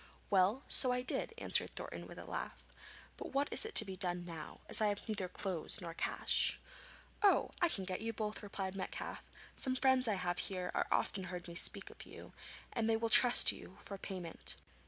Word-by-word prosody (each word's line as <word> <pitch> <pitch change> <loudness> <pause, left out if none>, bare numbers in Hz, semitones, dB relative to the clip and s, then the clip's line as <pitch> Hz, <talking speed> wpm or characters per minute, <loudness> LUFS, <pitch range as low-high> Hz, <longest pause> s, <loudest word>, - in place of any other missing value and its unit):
'Well, 200 +7 +3
so 255 - +2
I 250 0 -1
did,' 260 - +1
answered - - +1
Thornton - - -6
with - - -11
a - - -9
laugh. - - -6 0.5
'But - - -8
what 280 +2 +1
is 440 - +5
to 220 - +9
be 190 -1 -6
done 175 -2 0
now, 165 -3 -8
as - - +2
I 215 - +3
have 205 +2 -3
neither 200 -4 -2
clothes 185 +2 -3
nor 170 -3 -7
cash?' - - +1 0.6
'Oh, 405 -2 +3
I 345 - +4
can 195 - -3
get 185 +1 -4
you 225 +1 -2
both!' 215 -1 -4
replied 195 -2 -5
Metcalfe; 195 - -5 0.4
'some 260 -1 0
friends 260 -1 +3
I 215 - +1
have 180 -1 -2
here 185 -2 -4
have - - 0
often 190 -2 0
heard 180 -1 -7
me 170 - -8
speak 175 - +3
of - - -11
you, - - -11 0.4
and 225 -2 0
they 225 - +3
will 225 0 -2
trust 245 -1 +7
you 185 - -11
for 200 - -7
payment.' 180 -5 -6
200 Hz, 200 wpm, -35 LUFS, 185-230 Hz, 0.6 s, to